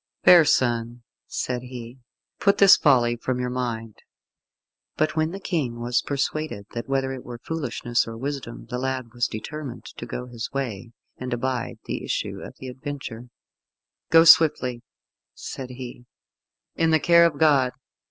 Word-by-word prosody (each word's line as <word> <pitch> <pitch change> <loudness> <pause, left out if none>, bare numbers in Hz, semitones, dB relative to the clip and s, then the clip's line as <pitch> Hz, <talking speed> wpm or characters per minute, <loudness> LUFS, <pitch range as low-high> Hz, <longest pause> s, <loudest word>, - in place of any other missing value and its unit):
"Fair 175 -2 +9
son," 120 -3 +1 0.2
said 125 -1 -3
he, 125 0 -9 0.4
"put 200 0 +3
this 200 -2 +9
folly 120 -5 +3
from 125 +1 -3
your 125 0 -2
mind." 115 -3 -4 1.0
But 155 0 +1
when 155 0 +1
the 195 +3 -6
King 145 -12 -2
was 120 +1 +1
persuaded 140 -5 -3
that 115 +2 -5
whether 135 -1 0
it 130 - -8
were 120 0 -8
foolishness 120 -5 -2
or 115 0 -7
wisdom 135 -2 -5
the 125 - -2
lad 130 -3 -3
was 120 -1 0
determined 135 +3 -7
to 120 - -9
go 125 +1 -5
his 120 -3 -6
way, 120 -6 -4 0.3
and 130 0 -6
abide 120 0 -2
the - - -4
issue - - -3
of - - -9
the 130 - -8
adventure, 130 -3 -7 0.8
"Go 165 +1 +7
swiftly," 135 -7 +5 0.5
said 130 -2 -7
he, 125 -1 -9 0.7
"in 165 -1 +1
the 160 -1 +4
care 170 +1 +6
of 150 -4 -5
God. 140 -4 +4
125 Hz, 155 wpm, -24 LUFS, 120-145 Hz, 1.0 s, Fair